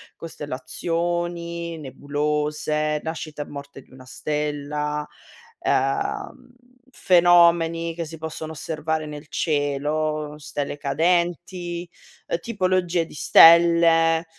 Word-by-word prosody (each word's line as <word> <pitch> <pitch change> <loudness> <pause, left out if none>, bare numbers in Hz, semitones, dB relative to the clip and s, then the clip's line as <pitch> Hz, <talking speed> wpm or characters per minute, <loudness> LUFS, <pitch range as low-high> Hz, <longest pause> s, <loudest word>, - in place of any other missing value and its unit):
costellazioni, 170 +3 -4
nebulose, 150 +2 -2
nascita 155 -2 -5
e - - -15
morte 140 -1 -9
di - - -25
una 130 0 -14
stella, 150 +1 -3 0.5
ehm, 380 -12 -2 0.4
fenomeni 170 -2 +4
che 165 0 -4
si 160 +1 -9
possono 160 0 -6
osservare 160 0 -3
nel 150 0 -9
cielo, 150 0 -1
stelle 145 -1 -5
cadenti, 175 +3 -1 0.5
tipologie 185 -4 0
di - - -15
stelle. 165 +2 +6
160 Hz, 90 wpm, -23 LUFS, 150-170 Hz, 0.5 s, stelle